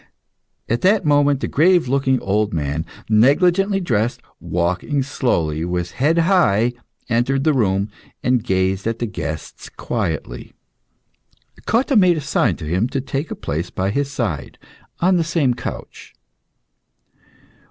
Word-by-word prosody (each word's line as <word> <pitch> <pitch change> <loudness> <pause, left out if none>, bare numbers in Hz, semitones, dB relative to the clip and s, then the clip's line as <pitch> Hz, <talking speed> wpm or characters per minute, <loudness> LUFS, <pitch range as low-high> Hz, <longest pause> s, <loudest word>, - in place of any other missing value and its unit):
At 115 - -1
that 195 0 +3
moment, 145 -2 +3
a - - 0
grave 175 0 +3
looking 130 0 +1
old 105 -1 0
man, 75 +1 -2 0.2
negligently 175 - +3
dressed, 120 - -1 0.2
walking 90 +11 -1
slowly, 85 - -1
with 90 0 -2
his - - -11
head 160 +4 +3
high, 145 - +3 0.3
entered 125 +3 +1
the 155 - +3
room, 100 -4 0 0.3
and 125 -2 +2
gazed 95 +1 0
at 115 0 -1
the 120 - -2
guests 80 -7 -6
quietly. 85 - -4 1.1
Cotta 255 +4 +2
made 180 -5 +5
a - - -2
sign 140 0 +1
to 80 - -8
him 90 +10 0
to 135 - -2
take 140 +3 -4
a - - -4
place 80 +4 -4
by 95 +1 -2
his 140 +4 -1
side, 100 - -4 0.4
on 185 +1 +4
the 170 - +2
same 155 -6 +1
couch. - - -8
125 Hz, 140 wpm, -20 LUFS, 95-150 Hz, 1.1 s, made